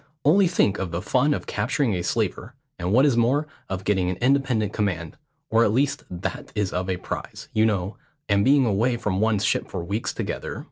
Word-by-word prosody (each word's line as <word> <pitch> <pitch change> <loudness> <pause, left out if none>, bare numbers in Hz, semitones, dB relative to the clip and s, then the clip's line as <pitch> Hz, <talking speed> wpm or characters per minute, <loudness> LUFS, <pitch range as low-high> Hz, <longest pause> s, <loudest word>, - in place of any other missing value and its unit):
Only 185 +6 +5
think 135 - +1
of 95 - -2
the 85 +1 -3
fun 130 +10 +1
of - - -1
capturing 120 +2 0
a 90 - -1
slaver, 110 +5 -2 0.2
and 90 +1 -2
what 130 +6 +5
is 140 -5 +3
more, 125 +6 +2 0.2
of 95 0 -4
getting 95 -3 +1
an 90 - -1
independent 125 -3 +1
command; 90 -7 -2 0.4
or 115 +1 +5
at 105 - +3
least 135 +5 0
that 90 -1 -5
is 105 -3 -1
of 90 +1 -2
a 90 - 0
prize, - - -7
you 110 +1 +4
know, 100 -2 -2 0.3
and 100 -1 +3
being 135 +2 +5
away 120 +3 +1
from 100 -4 -1
one's 110 -2 +2
ship - - 0
for 90 -3 -4
weeks 100 +6 -2
together. - - -4
105 Hz, 205 wpm, -24 LUFS, 95-125 Hz, 0.4 s, Only